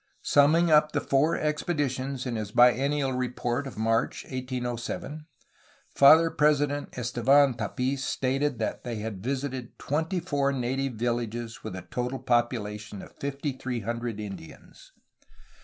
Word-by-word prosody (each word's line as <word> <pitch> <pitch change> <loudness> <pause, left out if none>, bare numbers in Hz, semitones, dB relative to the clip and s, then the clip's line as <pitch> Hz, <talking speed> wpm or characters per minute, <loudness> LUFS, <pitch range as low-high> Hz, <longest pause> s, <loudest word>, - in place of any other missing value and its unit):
Summing 160 +4 +4
up 150 0 +5
the 145 - +2
four 145 +3 +2
expeditions 140 -4 -2
in 125 -2 -2
his 105 -2 -3
bi 125 +2 +6
ennial 140 0 0
report 125 +1 -2
of 130 - -9
March 115 +1 0
1807, 130 +4 -5 0.7
Father 160 +4 +7
President 145 -1 +1
Estevan 125 +3 +3
Tapis 130 +4 -2
stated 135 +1 0
that 110 - -3
they 120 -1 -4
had 105 -3 -5
visited 130 -1 -4
twenty 160 +6 -1
four 145 -5 0
native 135 0 -2
villages 120 0 -3
with - - -6
a 90 - -7
total 125 +5 -3
population 105 -5 -1
of - - -14
fifty 140 +1 -3
three 130 -2 -4
hundred 115 0 -4
Indians. 100 -5 -10
130 Hz, 135 wpm, -27 LUFS, 120-145 Hz, 0.7 s, Father